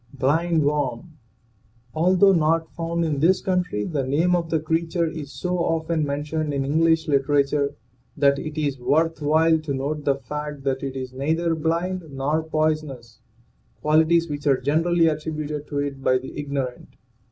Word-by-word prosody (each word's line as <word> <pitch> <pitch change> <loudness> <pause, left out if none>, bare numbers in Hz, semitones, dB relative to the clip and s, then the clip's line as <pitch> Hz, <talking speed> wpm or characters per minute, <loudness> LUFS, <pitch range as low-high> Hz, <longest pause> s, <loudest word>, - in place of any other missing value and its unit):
BLIND 160 +5 +1
WORM. 145 +1 -1 0.8
Although 185 +4 +4
not 165 -1 +1
found 170 0 -2
in 150 -3 -1
this 180 +5 +4
country, 180 - -1
the 145 +3 -2
name 160 +7 +2
of 170 -2 -2
the 160 - +1
creature 165 +2 0
is 155 -3 -6
so 180 0 -2
often 165 -1 0
mentioned 150 +1 -2
in 135 -1 -1
English 160 +3 +2
literature 140 0 +1 0.4
that 140 -1 +3
it 155 +1 -5
is 140 -3 -1
worth 160 +5 +1
while 160 +2 +3
to 155 -2 -4
note 145 +3 -3
the 140 -1 +2
fact 150 +1 -6
that 135 -1 -1
it 135 -1 -4
is 130 -1 -5
neither 160 +5 0
blind 170 +3 -1
nor 140 +3 -1
poisonous, 155 -7 -2 0.6
qualities 160 +2 +3
which 145 -1 -5
are 135 -2 +4
generally 165 +3 +2
attributed 150 -1 -3
to 145 - -4
it 140 -1 -3
by 130 -1 +3
the 130 +1 -8
ignorant. 140 -4 -4
155 Hz, 160 wpm, -23 LUFS, 140-165 Hz, 0.8 s, Although